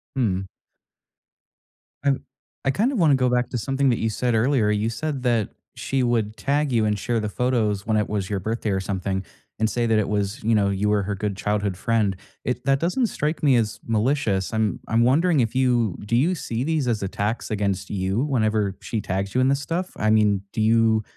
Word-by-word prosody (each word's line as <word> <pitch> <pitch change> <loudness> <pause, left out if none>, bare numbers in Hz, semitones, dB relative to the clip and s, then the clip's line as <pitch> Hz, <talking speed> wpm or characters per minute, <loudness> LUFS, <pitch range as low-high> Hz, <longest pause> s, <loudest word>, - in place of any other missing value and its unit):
Hmm. 95 -7 0 1.6
I 140 - +3
w 135 - 0 0.4
I 135 - +3
kinda 250 - +1
wanna 160 -8 +4
go 130 -1 +2
back 125 0 +1
to 125 - -3
something 135 +3 +1
that 120 - +1
you 115 - 0
said 120 +2 -1
earlier, 115 -2 +2
you 105 +2 0
said 135 +3 -3
that 115 -4 +1 0.3
she 135 -1 -1
would 110 -3 0
tag 145 0 0
you 115 -2 +2
and 105 -1 +1
share 115 +3 -1
the 105 - -2
photos 110 -4 0
when 110 -1 +1
it 105 - 0
was 100 -3 -2
your 100 -2 -1
birthday 110 +2 -2
or 95 - +1
something, 95 0 -2 0.4
and 110 0 +2
say 120 -1 0
that 110 -1 +3
it 105 - -1
was, 105 +4 -2
you 110 +1 +2
know, 100 -1 +3
you 100 +2 0
were 105 -2 +2
her 100 +1 -2
good 100 -1 -3
childhood 105 -2 -1
friend. 110 -3 +1 0.3
It 125 +1 -2
that 135 0 +3
doesn't 185 - +1
strike 155 -5 -2
me 135 -4 +5
as 110 -3 0
malicious. 110 -3 0
I'm 110 -2 0
I'm 115 +1 +3
wondering 155 +5 +3
if 115 - -1
you 120 -6 +2
do 115 - 0
you 155 +10 +3
see 120 -6 -3
these 155 -3 0
as 110 -4 0
attacks 105 +5 -2
against 100 -2 -1
you 95 +4 0
whenever 110 -8 0
she 115 - -3
tags 95 +2 -3
you 130 - +3
in 130 - +3
this 140 +1 +1
stuff? 175 +5 -3
I 110 - +1
mean, 105 -3 +3
do 110 - -1
you 110 0 +3
115 Hz, 215 wpm, -23 LUFS, 105-130 Hz, 1.6 s, me